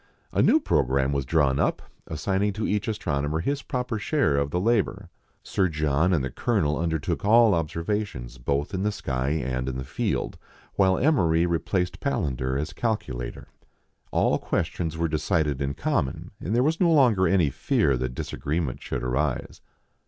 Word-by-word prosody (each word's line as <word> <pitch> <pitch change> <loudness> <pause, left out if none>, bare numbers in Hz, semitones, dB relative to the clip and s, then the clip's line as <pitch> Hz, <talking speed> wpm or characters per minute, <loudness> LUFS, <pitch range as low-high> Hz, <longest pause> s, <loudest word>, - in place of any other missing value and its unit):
A - - +2
new 315 - +5
programme 70 - +1
was 70 -2 -1
drawn 70 -4 +2
up, - - 0 0.2
assigning 95 +6 0
to 105 +2 -3
each 105 0 -1
astronomer 75 -8 -1
his 140 +10 -1
proper 125 -5 -3
share 145 - +1
of 70 0 +1
the 90 - -1
labour. 100 -3 0 0.3
Sir 95 - +1
John 75 +1 +1
and 80 -7 +2
the 65 - -3
Colonel 90 -12 0
undertook 80 0 -1
all 110 +1 +6
obser 85 0 -2
vations 65 - -3
both 70 +5 -1
in 95 - -1
the 105 +1 +1
sky 65 -9 -2
and 65 -3 -1
in 65 - -4
the 65 - -4
field; - - -2 0.3
while 95 -2 +3
Emery 85 - +3
replaced 90 +2 -1
Palander 65 - -1
as 75 - -4
calculator. 65 - -3 0.6
All - - +2
questions 80 -1 -2
were 85 0 +1
decided 75 -3 0
in 70 0 -1
common, 65 - -2
and 105 - -2
there 125 - +3
was 160 +4 +1
no 175 -2 +4
longer 120 - +4
any 90 -7 +3
fear 70 +1 +1
that 65 0 -3
disagreement 75 -1 -3
should 60 -2 -4
arise. 65 +2 -2
80 Hz, 165 wpm, -25 LUFS, 70-100 Hz, 0.6 s, all